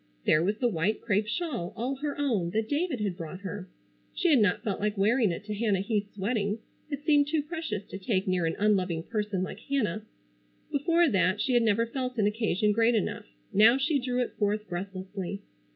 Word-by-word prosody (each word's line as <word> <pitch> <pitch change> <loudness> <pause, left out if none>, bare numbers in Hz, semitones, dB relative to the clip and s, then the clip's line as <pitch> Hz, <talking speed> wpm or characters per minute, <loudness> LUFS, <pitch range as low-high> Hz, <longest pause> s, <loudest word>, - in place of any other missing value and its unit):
There 155 - +4
was 205 +4 0
the 245 - +2
white 200 +1 0
crêpe 210 -1 0
shawl, 240 - -3
all 250 +4 -2
her 290 +1 -3
own, 230 -12 0
that 220 0 +1
David 295 -3 -1
had 200 -4 -1
brought 170 +2 -7
her. 195 -1 -6 0.5
She 355 - +2
had 280 - +6
not 205 -4 +2
felt 200 -3 -2
like 210 0 -1
wearing 215 +1 +3
it 170 - -5
to 210 0 -4
Hannah 205 -3 +1
Heath's 205 0 -2
wedding, 205 0 0 0.3
it 290 -1 -5
seemed 290 -2 +4
too 300 0 0
precious 305 - -4
to 195 - -8
take 190 -1 0
near 180 -3 +1
an 165 - -1
unloving 185 -6 +1
person 210 -3 -2
like 190 - -6
Hannah. 220 -7 -1 0.7
Before 335 +4 +3
that 190 - +2
she 255 - 0
had 240 - +5
never 225 0 +2
felt 250 +1 -4
an 210 - +3
occasion 210 -1 +1
great 230 +2 +3
enough. 210 - -2 0.3
Now 225 +5 +7
she 280 +2 +1
drew 250 -1 -1
it 245 - -2
forth 210 0 0
breathlessly. 190 +2 -5
210 Hz, 200 wpm, -28 LUFS, 195-250 Hz, 0.7 s, Now